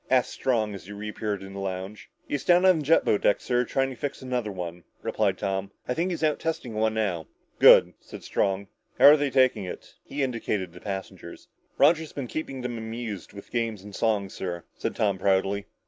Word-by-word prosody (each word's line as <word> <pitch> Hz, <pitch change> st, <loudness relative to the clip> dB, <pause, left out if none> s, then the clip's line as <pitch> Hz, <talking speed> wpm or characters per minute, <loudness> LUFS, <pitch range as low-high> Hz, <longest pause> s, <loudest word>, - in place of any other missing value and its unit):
asked 130 Hz, -1 st, +3 dB
Strong, 110 Hz, -5 st, 0 dB
as 95 Hz, -2 st, -9 dB
he -, -, -9 dB
reappeared 105 Hz, -1 st, -4 dB
in 95 Hz, 0 st, -9 dB
the 100 Hz, -, -6 dB
lounge. 95 Hz, +2 st, -5 dB, 0.2 s
"He's 145 Hz, -, -2 dB
down 180 Hz, +1 st, +5 dB
on 185 Hz, -3 st, +6 dB
the -, -, -3 dB
jet 165 Hz, +4 st, +4 dB
boat 105 Hz, -, +2 dB
deck, 105 Hz, -, +3 dB
sir, 125 Hz, 0 st, 0 dB
trying 135 Hz, +2 st, 0 dB
to -, -, -7 dB
fix 140 Hz, +3 st, -4 dB
another 125 Hz, -4 st, -2 dB
one," 90 Hz, -2 st, -6 dB, 0.2 s
replied -, -, 0 dB
Tom. 95 Hz, 0 st, -2 dB, 0.2 s
"I 125 Hz, -, 0 dB
think 170 Hz, +7 st, 0 dB
he's 170 Hz, -3 st, -3 dB
out 155 Hz, -1 st, +2 dB
testing 160 Hz, -8 st, -3 dB
one 110 Hz, 0 st, +1 dB
now." 95 Hz, -7 st, -1 dB, 0.3 s
"Good," -, -, +8 dB
said -, -, -11 dB
Strong. 100 Hz, 0 st, 0 dB, 0.3 s
"How're 145 Hz, -, +9 dB
they 145 Hz, -2 st, 0 dB
taking 130 Hz, -5 st, +3 dB
it?" 90 Hz, -, -8 dB
He 140 Hz, 0 st, -3 dB
indicated 105 Hz, -8 st, -2 dB
the 90 Hz, -, -12 dB
passengers. 95 Hz, -1 st, -7 dB, 0.3 s
"Roger's 160 Hz, +2 st, +4 dB
been 140 Hz, -, -4 dB
keeping 135 Hz, 0 st, -5 dB
them 120 Hz, -2 st, -4 dB
amused 110 Hz, -5 st, -6 dB
with 100 Hz, -, -11 dB
games 115 Hz, -4 st, -2 dB
and 105 Hz, 0 st, -11 dB
songs, 100 Hz, -3 st, 0 dB
sir," 85 Hz, -2 st, -5 dB
said -, -, -4 dB
Tom 100 Hz, -3 st, +1 dB
proudly. 100 Hz, +1 st, +1 dB
110 Hz, 205 wpm, -26 LUFS, 100-130 Hz, 0.3 s, How're